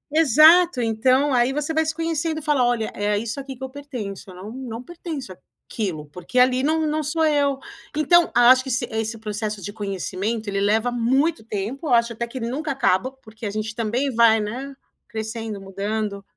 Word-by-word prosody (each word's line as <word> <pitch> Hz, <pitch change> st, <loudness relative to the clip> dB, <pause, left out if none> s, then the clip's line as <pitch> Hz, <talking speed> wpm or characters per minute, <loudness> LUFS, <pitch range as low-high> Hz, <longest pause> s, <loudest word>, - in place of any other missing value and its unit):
Exato, 320 Hz, +1 st, +6 dB
então 255 Hz, +5 st, +2 dB
aí 245 Hz, +1 st, +3 dB
você 295 Hz, +3 st, -2 dB
vai 320 Hz, -, +2 dB
se 315 Hz, 0 st, -2 dB
conhecendo 325 Hz, -1 st, -1 dB
e -, -, -12 dB
fala: 295 Hz, -5 st, +2 dB
"Olha, 240 Hz, -2 st, 0 dB
é 205 Hz, 0 st, 0 dB
isso 235 Hz, +5 st, -4 dB
aqui 270 Hz, -1 st, -7 dB
que 260 Hz, -, -10 dB
eu 265 Hz, -, -4 dB
pertenço, 245 Hz, -10 st, -7 dB
eu 180 Hz, -, -11 dB
não 200 Hz, +4 st, -9 dB
não 245 Hz, -2 st, -7 dB
pertenço 315 Hz, -, -7 dB, 0.3 s
àquilo", 175 Hz, -9 st, -4 dB
porque 180 Hz, +10 st, -7 dB
ali 255 Hz, 0 st, +4 dB
não 315 Hz, +3 st, +1 dB
não 305 Hz, +1 st, 0 dB
sou 320 Hz, +2 st, 0 dB
eu". 285 Hz, -3 st, +2 dB, 0.4 s
Então 345 Hz, +3 st, +4 dB
acho 255 Hz, +2 st, +6 dB
que 265 Hz, -, -7 dB
se 245 Hz, +1 st, 0 dB
esse 220 Hz, +1 st, -2 dB
processo 215 Hz, -1 st, -4 dB
de 205 Hz, -, -6 dB
conhecimento 205 Hz, +2 st, -3 dB
ele 200 Hz, 0 st, -1 dB
leva 220 Hz, +4 st, +2 dB
muito 255 Hz, +3 st, +1 dB
tempo, 225 Hz, +8 st, -4 dB
acho 235 Hz, -1 st, +3 dB
até 235 Hz, +1 st, -4 dB
que 260 Hz, +2 st, -7 dB
nunca 265 Hz, +7 st, -3 dB
acaba, 255 Hz, -1 st, +1 dB
porque 225 Hz, -4 st, -12 dB
a -, -, -2 dB
gente 215 Hz, +1 st, -3 dB
também 240 Hz, +4 st, -1 dB
vai, 230 Hz, -1 st, +5 dB
né, 255 Hz, +6 st, -5 dB, 0.3 s
crescendo, 220 Hz, -1 st, -5 dB
mudando. 200 Hz, +1 st, -4 dB
240 Hz, 190 wpm, -23 LUFS, 215-280 Hz, 0.4 s, Exato